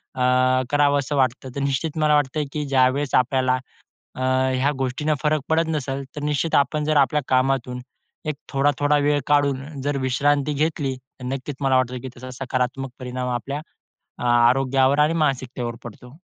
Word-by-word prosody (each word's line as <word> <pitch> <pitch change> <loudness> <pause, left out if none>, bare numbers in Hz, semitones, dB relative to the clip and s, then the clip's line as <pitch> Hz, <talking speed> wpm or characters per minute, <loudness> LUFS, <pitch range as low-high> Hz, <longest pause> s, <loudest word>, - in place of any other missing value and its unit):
अ, 130 0 +3
करावंस 145 -1 +2
वाटतं. 130 -1 0
तर - - -3
निश्चित 140 +3 -1
मला 150 -1 +4
वाटतं 145 +1 +1
की 150 -1 -2
ज्यावेळेस 135 +1 +2
आपल्याला 130 0 +2 0.6
अ, - - -6 0.3
ह्या 135 +3 +2
गोष्टींना 135 +4 0
फरक 150 0 +2
पडत 160 +1 +2
नसेल, 140 -3 -2
तर 150 - -5
निश्चित 150 +2 0
आपण 150 +2 +2
जर 155 0 +2
आपल्या 145 +2 +3
कामातून 130 -1 +1 0.5
एक 155 -1 -2 0.2
थोडा-थोडा 145 +1 +2
वेळ 145 0 +3
काढून 140 0 0
जर 145 +1 -1
विश्रांती 145 +3 +1
घेतली, 145 -2 -1
तर 130 0 -14
नक्कीच 135 +2 -4
मला 135 -1 +2
वाटतं, 130 0 -1
की 130 - -6
त्याचा 130 0 -10
सकारात्मक 130 +1 -2
परिणाम 125 0 -4
आपल्या 140 +5 -4 0.7
आरोग्यावर 130 +3 +3
आणि 150 +2 +4
मानसिकतेवर 130 -6 -1
पडतो. 125 +4 -11
135 Hz, 155 wpm, -23 LUFS, 130-145 Hz, 0.7 s, मला